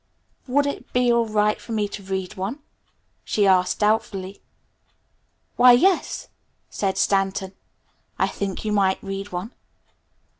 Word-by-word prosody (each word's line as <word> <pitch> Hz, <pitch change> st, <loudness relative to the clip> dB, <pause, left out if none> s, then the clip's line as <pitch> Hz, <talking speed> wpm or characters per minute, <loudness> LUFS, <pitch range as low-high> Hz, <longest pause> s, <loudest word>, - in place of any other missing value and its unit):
"Would 285 Hz, +3 st, +2 dB
it 285 Hz, -, -5 dB
be 245 Hz, -1 st, +3 dB
all 235 Hz, -1 st, +2 dB
right 210 Hz, 0 st, +1 dB
for 230 Hz, -, -7 dB
me 210 Hz, -2 st, 0 dB
to 205 Hz, -, -7 dB
read 190 Hz, 0 st, -4 dB
one?" 200 Hz, +6 st, -4 dB, 0.7 s
she 205 Hz, -, +1 dB
asked 185 Hz, -1 st, +3 dB
doubtfully. 205 Hz, -3 st, -1 dB, 1.2 s
"Why, 250 Hz, 0 st, +8 dB
yes," 360 Hz, +10 st, +2 dB, 0.4 s
said 195 Hz, -2 st, -1 dB
Stanton. 195 Hz, -1 st, 0 dB, 0.6 s
"I -, -, +2 dB
think 200 Hz, +1 st, -4 dB
you 215 Hz, -, -1 dB
might 195 Hz, -2 st, +1 dB
read 195 Hz, +1 st, -5 dB
one." 180 Hz, +6 st, -5 dB
205 Hz, 135 wpm, -23 LUFS, 190-225 Hz, 1.2 s, Why